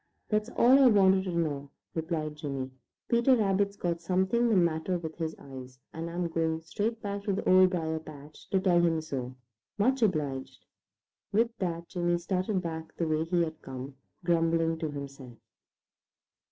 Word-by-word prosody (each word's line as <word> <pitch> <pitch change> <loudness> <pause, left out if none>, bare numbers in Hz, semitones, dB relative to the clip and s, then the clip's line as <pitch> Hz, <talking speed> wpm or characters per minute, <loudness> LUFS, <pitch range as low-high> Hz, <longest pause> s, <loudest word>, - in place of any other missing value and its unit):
"That's 215 +1 +1
all 255 +3 +7
I 270 - +7
want 190 -4 +5
to - - -3
know," 150 -5 -1 0.2
replied 160 -2 -2
Jimmy. 135 -4 -4 0.4
"Peter 235 +2 +4
Rabbit's 200 -2 +1
got 170 -1 -2
something 190 +7 +2
the 220 - +3
matter 170 0 +2
with 160 -2 -6
his 160 -1 -2
eyes, 130 -2 -10 0.2
and 165 +1 -4
I'm 175 +1 -2
going 160 -1 0
straight 210 +8 -3
back 200 0 -3
to 200 - +1
the 190 - -3
Old 185 0 +7
Briar 160 -3 -2
patch 150 -1 -13
to 195 - +2
tell 180 -2 +3
him 165 -2 +2
so. 130 -5 -5 0.4
Much 255 +5 +2
obliged." 150 - -1 0.7
With 230 +3 +2
that 170 -2 -2
Jimmy 175 -1 0
started 185 +2 -1
back 160 -1 -6
the 165 - 0
way 155 0 +1
he 170 0 +2
had 160 -1 -5
come, 130 +1 -7 0.3
grumbling 165 -1 +2
to 160 -2 -2
himself. 140 -4 -8
170 Hz, 165 wpm, -29 LUFS, 155-190 Hz, 0.7 s, all